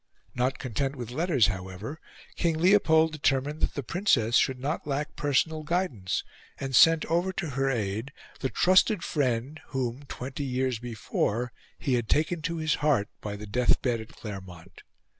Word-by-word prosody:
Not 125 +1 0
content 135 +3 -2
with 120 -3 -6
letters, 150 - +3
however, 95 - -4 0.4
King 165 -2 +1
Leopold 160 -3 +5
determined 145 0 0
that - - 0
the 140 - -3
Princess 125 - +2
should 130 0 +3
not 145 +4 -3
lack 145 +1 -2
personal 150 +2 +1
guidance, 150 - -1 0.4
and 135 -1 -2
sent 165 +4 +7
over 175 +4 +1
to 160 -5 -3
her 135 +1 0
aid 110 +1 -2 0.3
the 130 - -1
trusted 185 - +4
friend 135 +1 -1
whom, 130 -1 -3
twenty 135 +3 -5
years 130 -2 -1
before, 120 0 -2 0.3
he 135 - -1
had 120 -3 0
taken 160 +2 +1
to 165 +2 -2
his 155 -1 +1
heart 145 -9 +2
by 105 -1 -4
the 105 +1 -8
death 120 +4 +2
bed 120 -3 0
at 110 - -11
Claremont. 95 -4 -9
135 Hz, 160 wpm, -28 LUFS, 115-155 Hz, 0.4 s, sent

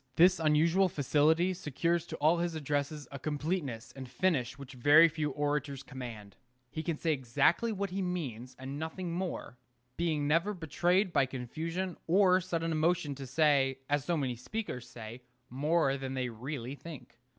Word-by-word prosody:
This 180 +2 +6
unusual 165 +5 +3
facility 155 +5 +2
secures 170 +1 -1
to - - -5
all 160 +3 +3
his 170 -1 -1
addresses 145 -1 -2
a 140 - -6
completeness 145 -5 -3
and 130 -2 -8
finish 125 -3 0
which 140 -1 -10
very 145 +6 +7
few 155 -2 -2
orators 145 -1 -2
command. 120 -7 -8 0.4
He 155 - -3
can 165 -2 -2
say 160 0 +1
exactly 145 - +2
what 200 -2 -3
he 195 +1 -2
means, 130 - -4
and 135 +2 -6
nothing 170 +3 -4
more, 170 -9 -4 0.4
being 155 -4 0
never 170 +7 +2
betrayed 175 +3 +1
by 135 - +3
confusion 165 +9 -4
or 185 +1 +5
sudden 165 -2 -2
emotion 160 -2 +1
to 135 -1 -8
say, 135 -2 +3
as 145 -1 +2
so 170 +3 0
many 130 -4 -1
speakers 125 - -5
say, 115 +1 -9 0.3
more 145 +1 +2
than 135 -1 -5
they 130 -1 -1
really 125 +2 -5
think. 140 -6 -11
150 Hz, 160 wpm, -31 LUFS, 135-170 Hz, 0.4 s, very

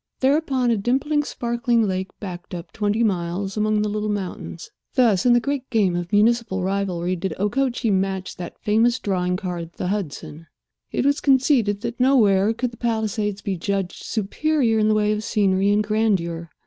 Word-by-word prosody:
Thereupon, 265 -3 +2
a 230 - +2
dimpling, 270 +8 +1
sparkling 235 -2 0
lake 190 0 -2
backed 180 -3 -7
up 170 +1 -8
twenty 210 +2 0
miles 190 -1 -1
among 215 0 +1
the - - 0
little 210 0 -2
mountains. 190 -4 -5 0.2
Thus 235 -5 +3
in 240 - +6
the 240 - +5
great 275 +1 -3
game 200 -6 +2
of 175 0 -4
municipal 215 -2 +2
rivalry 185 -2 -1
did 190 +2 -3
Okochee 235 +3 0
match 190 -1 -1
that 175 -1 -7
famous 230 +3 +2
drawing 180 -5 -1
card, 175 -3 -5
the 180 - -3
Hudson. 165 -4 -5 0.4
It - - -1
was 285 +1 +2
conceded 255 -7 +3
that 235 +1 -5
nowhere 220 -6 +4
could 240 +2 -2
the 235 - -14
Palisades 215 -3 -2
be 195 - -1
judged 195 +1 -3
superior 230 +2 0
in 215 - +3
the 215 - +3
way 210 0 +2
of 215 0 -1
scenery 200 -3 +2
and 205 +1 +3
grandeur. 190 -6 0
210 Hz, 175 wpm, -22 LUFS, 190-235 Hz, 0.4 s, in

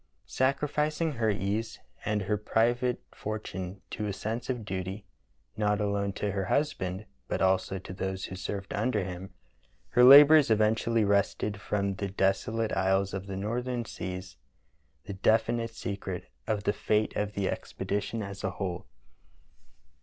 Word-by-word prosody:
Sacrific 150 +3 0
ing 165 -2 +1
her 115 -5 0
ease 105 +2 -1 0.3
and 105 -1 0
her 105 +3 0
private 120 +4 +1
fortune 100 -3 -5
to 105 -2 -3
a 100 - -2
sense 115 +5 -4
of 120 -4 -2
duty, 95 +2 -4 0.5
not 105 -1 +1
alone 100 -1 0
to 105 +1 -2
her 95 -1 -2
husband 100 -8 -1 0.2
but - - -1
also 95 0 +2
to 95 0 -8
those 95 0 -3
who 95 - -7
served 95 +1 -5
under 105 -1 0
him, 90 +1 -6 0.6
her 125 - +4
labors 145 +2 +9
eventually 110 +1 +3
wrested 100 0 +1
from 100 -2 -1
the 100 +1 -3
deso 95 +2 +1
late 115 -1 0
isles 95 0 +1
of 95 0 -4
the 95 -1 -4
northern 120 +4 -2
seas 95 -3 -6 0.7
the 100 - -5
definite 115 +3 +1
secret 95 -5 -5 0.2
of 105 -2 0
the 100 - +1
fate 105 0 0
of 105 0 -1
the 100 -2 -1
expedition 105 +4 -3
as 100 0 -7
a 95 - +1
whole. 90 -1 -4
105 Hz, 155 wpm, -29 LUFS, 95-115 Hz, 0.7 s, labors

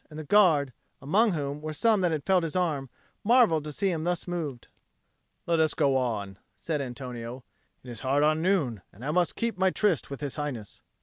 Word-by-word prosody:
And 155 - -10
the 155 - -5
Guard, 155 -7 +4 0.3
among 200 - +2
whom 145 -2 -3
were 155 0 -4
some 215 +5 +2
that 175 -2 +2
had 155 -3 -2
felt 190 -2 +3
his 165 -1 -4
arm, 155 -7 0 0.3
marvelled 220 - +4
to 150 - -4
see 195 +6 0
him 160 -2 -2
thus 175 +1 -2
moved. 155 -8 -4 0.8
"Let 170 -1 +1
us 160 -1 +2
go 140 -1 +2
on," 105 -7 -2 0.2
said 155 -3 -2
Antonio. 125 -1 -6 0.4
"It 125 - -9
is 120 - -8
hard 140 +2 +2
on 155 +1 +2
noon, 160 - +1
and 115 +7 -11
I 150 - 0
must 175 +1 +1
keep 230 -5 -2
my 190 0 +4
tryst 190 -4 0
with 140 - -6
His 145 0 -4
Highness." 135 -8 -5
155 Hz, 205 wpm, -27 LUFS, 135-180 Hz, 0.8 s, Guard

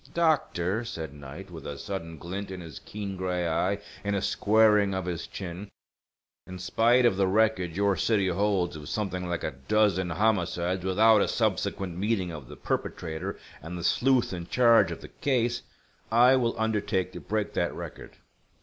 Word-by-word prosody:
"Doctor," 120 - +1
said 80 -10 -6
Knight, 75 +7 -10
with 80 -4 -8
a 70 - -5
sudden 85 -3 -5
glint 95 +6 -5
in 95 -1 -6
his 80 -4 -9
keen 100 -2 -6
gray 90 -2 -1
eye 80 - +1 0.3
and 100 0 0
a 100 - 0
squaring 105 -2 +4
of 95 -1 -2
his 85 -2 -4
chin, 95 +2 -7 0.8
"in 95 - -7
spite 115 +7 +3
of 100 -5 +3
the 95 -1 +3
record 95 -4 +2
your 100 0 +2
city 100 +2 +2
holds 95 -2 +1
of 75 -2 -8
something 95 -4 -2
like 85 -1 -3
a 80 - -2
dozen 100 -4 +3
homicides 90 -2 0
without 105 +3 +5
a - - +2
subsequent 90 -3 -1
meeting 100 -3 0
of 75 -6 -8
the - - -11
perpetrator, 85 +3 -3 0.2
and 85 +4 -6
the 85 - -6
sleuth 125 +4 +2
in 85 -2 -5
charge 115 0 +5
of - - -6
the - - -9
case, 120 -3 0 0.5
I 125 +3 +6
will 120 -3 0
undertake 105 -4 0
to - - -8
break 105 0 -2
that - - -1
record. - - -8
95 Hz, 175 wpm, -28 LUFS, 85-110 Hz, 0.8 s, I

